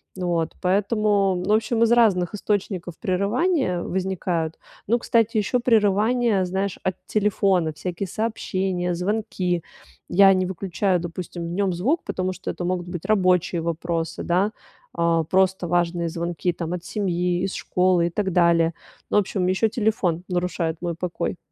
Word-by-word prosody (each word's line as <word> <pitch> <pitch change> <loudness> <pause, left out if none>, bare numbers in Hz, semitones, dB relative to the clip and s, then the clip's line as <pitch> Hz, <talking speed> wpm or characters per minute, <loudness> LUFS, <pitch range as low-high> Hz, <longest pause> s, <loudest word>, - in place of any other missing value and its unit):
Вот. 175 -3 -1
Поэтому, 200 +1 +2
ну, 205 +3 +1
в - - +7
общем, 225 +1 -1
из 230 0 +4
разных 210 -6 +3
источников 190 -4 -2
прерывания 205 - 0
возникают. 180 -3 -2 0.3
Ну, 235 +3 +2
кстати, 230 -1 +1
ещё 215 +4 +1
прерывания, 220 -2 +2
знаешь, 190 +1 -2
от 185 -1 0
телефона, 195 -6 +1
всякие 180 +4 -4
сообщения, 190 -4 -2
звонки. 180 -2 -1 0.5
Я 195 +1 +7
не 185 0 +1
выключаю, 185 0 -1
допустим, 175 0 -6
в - - -5
нём 195 -1 0
звук, 260 - 0
потому 185 0 -2
что 185 0 -5
это 175 - -6
могут 180 0 -2
быть 175 -2 -6
рабочие 180 -4 +2
вопросы, 165 0 -2
да, 190 +5 +1 0.4
э, 165 -1 +2
просто 190 -1 +2
важные 170 0 0
звонки 170 +1 -2
там: 170 0 -4
от 180 -1 -5
семьи, 180 -3 -1
из 195 - -2
школы 180 -2 +2
и - - -2
так 190 0 -1
далее. 170 -1 +3 0.4
Ну, - - +2
в - - +8
общем, 185 -1 -2
еще 190 +4 +2
телефон 210 -6 0
нарушает 175 -2 -1
мой 175 -1 -2
покой. 175 +1 -3
185 Hz, 155 wpm, -23 LUFS, 175-205 Hz, 0.5 s, в